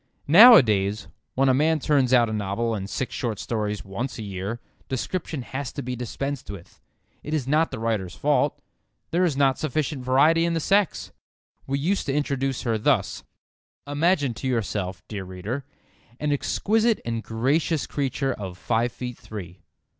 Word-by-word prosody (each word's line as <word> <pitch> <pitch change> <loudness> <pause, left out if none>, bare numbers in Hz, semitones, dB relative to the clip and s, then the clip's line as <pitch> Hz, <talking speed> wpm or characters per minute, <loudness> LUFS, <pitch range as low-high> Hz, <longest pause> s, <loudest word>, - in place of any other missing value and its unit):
Nowadays, 120 - +7 0.3
when 135 +1 +3
a 130 - +5
man 155 +4 +2
turns 135 -4 +2
out 120 -2 +5
a 110 - -4
novel 105 +3 -1
and 100 -2 -4
six 130 - -3
short 115 -4 -2
stories 105 -2 -3
once 105 +7 -4
a 110 - -5
year, 100 +3 -4 0.3
description 145 +2 -3
has 130 +1 -5
to - - -5
be 125 +1 -4
dispensed 135 +3 -4
with. 100 -4 -10 0.4
It 150 - -3
is 135 -5 -2
not 155 +3 +2
the 130 - -6
writer's 110 -6 -2
fault. - - +1 0.5
There 175 +2 +2
is 160 -6 +1
not 135 -2 +3
sufficient 150 -2 -2
variety 150 +6 +4
in 170 0 0
the - - +1
sex. 195 +3 +1 0.6
We 140 +1 0
used 175 +7 -1
to 135 - 0
introduce 135 -3 -1
her 115 -3 0
thus: 115 -4 +1 0.6
"Imagine 145 -2 +1
to 125 +4 -5
yourself, 100 -6 -2
dear 100 -3 -5
reader, 95 +9 -5 0.5
an 150 -1 -1
exquisite 220 - +1
and 115 -1 -2
gracious 140 +8 0
creature 135 -1 -1
of 95 -3 -7
five 115 +5 0
feet 125 0 -7
three. 100 -6 -9
130 Hz, 165 wpm, -24 LUFS, 110-150 Hz, 0.6 s, Nowadays